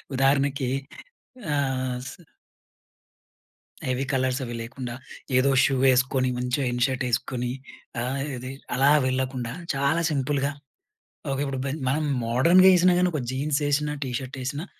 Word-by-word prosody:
ఉదాహరణకి. 135 0 +2 0.9
ఆహ్, 130 -2 -1
స్ - - -9 1.8
హెవీ 130 +1 0
కలర్సవీ 130 -1 -1
లేకుండా, 120 0 -6 0.4
ఏదో 130 +2 +4
షూ 135 - +2
వేసుకొని, 130 0 +3
మంచిగా 125 +2 -1
ఇన్ 120 0 -2
షర్ట్ 130 -1 -2
ఏసుకొని, 125 +1 -1 0.5
ఆహ్, 135 +2 -2 0.2
ఇది 125 +1 -6 0.3
అలా 135 +2 +5 0.2
వెళ్ళకుండా, 130 -2 -2 0.2
చాలా 140 +5 +1
సింపుల్‌గా. 140 0 0 0.8
ఓకే, 135 - -2
ఇప్పుడు 135 -1 -3
బెన్ 145 +3 -3
మనం 150 +4 +1 0.2
మోడ్రన్‌గా 165 +11 +5
ఏసినా 180 0 +5
గాని, 180 0 +3
ఒక 150 - -1
జీన్సేసినా, 145 +1 0
టీ 130 - -4
షర్ట్ 130 +1 -8
ఏసినా 145 +7 -4
135 Hz, 125 wpm, -25 LUFS, 130-145 Hz, 1.8 s, అలా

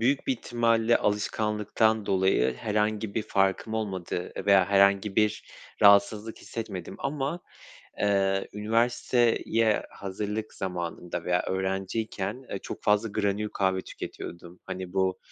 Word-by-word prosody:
büyük 135 +4 +1
bir - - +3
ihtimalle 115 -1 +2
alışkanlıktan 105 +1 0
dolayı 95 -10 +2
herhangi 105 - -1
bir 110 - 0
farkım 100 +1 0
olmadı 95 -5 -3
veya 100 -2 +6
herhangi 100 0 +3
bir 105 -1 +2 0.4
rahatsızlık 105 +2 +5
hissetmedim 95 -6 -6
ama, 145 +4 -2 0.6
eee, 95 -1 +1
üniversiteye 115 0 +2
hazırlık 105 +2 -5
zamanında 90 -2 -4
veya 90 0 +1
öğrenciyken, 95 +4 -3
eee, 100 - -3
çok - - -8
fazla 105 +2 +2
granül 105 0 -1
kahve 95 -1 +1
tüketiyordum. 85 0 -8
Hani, 95 -1 -6
bu 95 -1 +1
105 Hz, 115 wpm, -27 LUFS, 95-110 Hz, 0.6 s, veya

